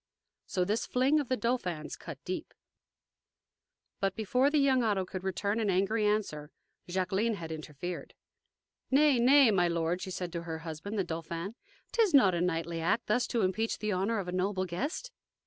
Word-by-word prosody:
So 180 -2 0
this 210 +4 -1
fling 265 +5 +3
of 285 - -3
the 255 - +1
Dauphin's 185 -11 -2
cut - - -9
deep. - - -5 1.4
But 195 -1 0
before 250 +5 +2
the 300 - +1
young 270 -3 +4
Otto 205 -5 +1
could 185 0 -6
return 200 +3 -1
an 215 -3 +1
angry 200 +3 +2
answer, 175 -9 -1 0.4
Jacqueline 190 +5 0
had 165 -4 -7
interfered. 155 +3 -6 0.7
"Nay, 280 -1 +5
nay, 260 0 +6
my 180 -3 +3
lord," 170 +1 0
she - - -5
said 180 -2 -4
to 170 - -3
her 165 -1 -5
husband, 165 +7 -5
the 195 - +2
Dauphin; 170 +3 -5 0.4
"'t 470 - +2
is 405 -9 +4
not 200 -9 +6
a 170 - 0
knightly 165 -1 -1
act 205 +8 +1
thus 245 +4 +1
to 235 - 0
impeach 190 +5 0
the 215 -1 -2
honor 200 +4 0
of 195 -3 -3
a - - -3
noble 185 +1 0
guest." 285 - -4
195 Hz, 180 wpm, -31 LUFS, 175-235 Hz, 1.4 s, nay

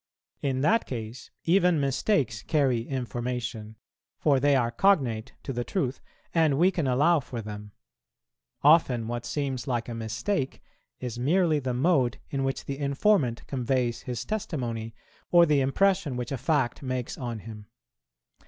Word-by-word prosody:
In 130 -2 0
that 220 +11 +2
case, 115 0 -6
even 180 -1 +3
mistakes 135 - 0
carry 135 -6 +1
information; 120 -4 -4 0.4
for 140 -3 +3
they 140 +1 +4
are 120 -3 +1
cognate 120 - +2
to 135 - -4
the 120 0 -2
truth, 135 -4 -2 0.3
and 160 -4 +3
we 180 +5 +4
can 165 -6 -1
allow 145 +6 +4
for 125 -3 -7
them. 105 -1 -7 0.9
Often 135 -7 +4
what 120 0 -4
seems 135 -3 -3
like 120 -3 -1
a 120 - -5
mistake 115 - -2 0.4
is 120 -2 -5
merely 160 +3 +2
the 130 -3 -2
mode 130 -3 +2
in 135 -1 -1
which 135 0 -2
the 135 0 -5
informant 140 - +1
conveys 125 -2 -1
his 125 -2 -5
testimony, 120 - -3 0.3
or 175 -1 +7
the 150 -3 +3
impression 170 0 +1
which 125 +1 -4
a 135 - -1
fact 135 -2 0
makes 130 -2 -3
on 120 -3 -4
him. 105 -1 -10
130 Hz, 150 wpm, -27 LUFS, 120-150 Hz, 0.9 s, or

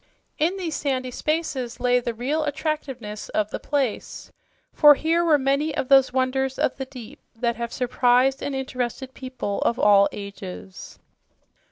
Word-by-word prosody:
In 340 +6 +1
these 335 -5 -3
sandy 260 -3 -2
spaces 285 -4 -2
lay 250 0 +3
the 235 -1 -4
real 285 +7 -1
attractiveness 285 -8 -4
of 210 0 -1
the - - -4
place, 275 -6 -3 0.4
for 295 -1 +8
here 330 +4 +1
were 320 -3 +4
many 280 +3 0
of 255 - -2
those 270 -2 +6
wonders 265 +1 0
of - - 0
the 265 - -4
deep 250 -1 -11 0.2
that 235 0 -1
have 235 -1 -4
surprised 250 +1 +2
and 285 - -3
interested 260 0 -4
people 255 -6 -4
in 235 - +2
all 200 -1 +5
ages. 95 - -9
260 Hz, 155 wpm, -24 LUFS, 235-285 Hz, 0.4 s, for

